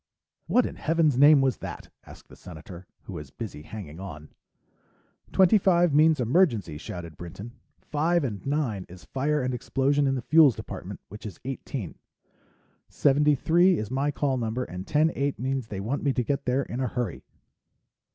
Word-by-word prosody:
"What 250 - +3
in - - -6
Heaven's 160 -3 +2
name 145 +2 +7
was 130 -2 +1
that?" - - -8 0.2
asked - - -14
the - - -13
Senator, 85 +1 -11 0.2
who - - -9
was 75 -2 -7
busy 100 - -7
hanging 80 -3 -9
on. 75 -6 -9 1.0
"Twenty 190 +3 +5
five 175 -4 +3
means 155 +1 +5
emergency," 120 - +1
shouted 85 0 -7
Dr. 75 - -22
Brinton. 95 +7 -8 0.3
"Five 165 +3 +1
and 105 -7 -4
nine 135 -10 -2
is 90 0 -13
fire 145 +1 -1
and 130 0 -1
explosion 140 +3 +1
in 135 - +1
the 125 - -4
Fuels 155 -5 +6
Department, - - -8
which 105 +2 -8
is 100 - -10
eighteen. 130 - -5 0.9
Seventy 145 +1 +3
three 175 +6 +3
is 110 +2 -4
my 135 +2 0
call 140 -2 0
number 115 +1 -2
and 90 -2 -7
ten 155 +2 +3
eight 140 0 -1
means 130 -1 -2
they 100 -3 -6
want 115 +9 -2
me 140 -2 +1
to 125 - 0
get 140 +3 -2
there 130 +2 +1
in 120 - -6
a 130 - 0
hurry." 120 -5 -3
130 Hz, 180 wpm, -26 LUFS, 105-150 Hz, 1.0 s, name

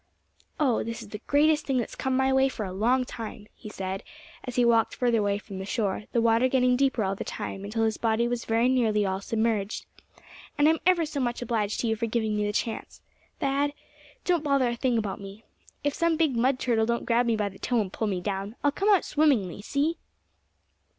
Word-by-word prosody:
"Oh! 265 -7 +2
this 230 +1 -5
is 210 - -13
the 210 0 -7
greatest 300 +1 +3
thing 270 -2 +1
that's 240 - -2
come 260 -1 -1
my 265 0 +2
way 265 0 +4
for 215 -5 -4
a 185 - -6
long 245 +6 +2
time," 220 -3 -7
he 215 - -10
said, 190 -1 -4 0.4
as 250 -2 -6
he 245 -2 +4
walked 230 -1 +3
further 240 -2 +2
away 200 -1 +1
from 200 -2 -8
the - - -4
shore, 205 -1 -1
the 235 - +1
water 230 +2 +4
getting 250 -1 +3
deeper 260 -3 +1
all 190 0 0
the 195 - -5
time 195 - -5
until 220 +3 -1
his 220 -1 +1
body 230 +1 +1
was 240 -1 -3
very 230 +2 +2
nearly 225 -5 +2
all 190 0 -2
submerged; 220 -1 -1 0.7
"and 290 - +5
I'm 320 0 +3
ever 350 -3 +4
so 295 -2 -4
much 245 -1 -1
obliged 220 -3 -1
to 235 - -1
you 220 - +1
for 230 +1 -2
giving 220 -2 0
me 210 0 0
the - - 0
chance, 220 +2 -3 0.4
Thad. 280 +1 0 0.5
Don't 350 -3 +2
bother 275 -4 +2
a 235 - -2
thing 245 -1 +1
about 205 -3 -3
me. 200 +3 -10 0.4
If 290 -1 +1
some 335 0 +1
big 310 -6 +2
mud 255 +3 +2
turtle 225 -3 +1
don't 235 0 -1
grab 240 +1 +2
me 230 - +2
by 210 -2 -1
the 195 - -15
toe, 245 -2 0
and 195 -3 -2
pull 220 - -1
me 190 -3 -1
down, 195 +2 -3
I'll 290 - +4
come 395 +8 0
out 395 -5 +4
swimmingly, 255 - +1
see?" 290 +9 -1
235 Hz, 225 wpm, -27 LUFS, 210-265 Hz, 0.7 s, and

